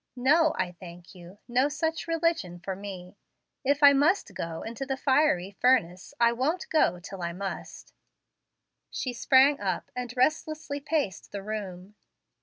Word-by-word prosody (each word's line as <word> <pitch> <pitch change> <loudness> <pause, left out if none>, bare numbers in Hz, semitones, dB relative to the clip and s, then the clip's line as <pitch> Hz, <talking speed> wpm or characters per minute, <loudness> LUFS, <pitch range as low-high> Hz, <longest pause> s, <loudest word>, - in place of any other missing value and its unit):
No, 305 +6 +3
I 180 - -1
thank 175 -1 -12
you. 180 +1 -13
No 255 +3 +2
such 320 +2 -2
religion 330 - 0
for 190 +2 -5
me. 190 -1 -9 0.5
If 285 +2 +1
I 285 0 +9
must 300 +8 +2
go 165 -1 -5
into 230 +4 -5
the 270 0 -3
fiery 260 - +2
furnace, 200 -1 +1
I 235 0 +5
won't 275 +9 -1
go 180 - +2
till 185 +2 -9
I 170 0 -3
must." 195 +2 -7 1.0
She 255 - -4
sprang 265 +4 +4
up, 195 -2 -3
and 250 -1 -4
restlessly 310 +1 0
paced 285 - -2
the 200 -1 -6
room. 200 -2 -6
245 Hz, 150 wpm, -27 LUFS, 185-285 Hz, 1.0 s, I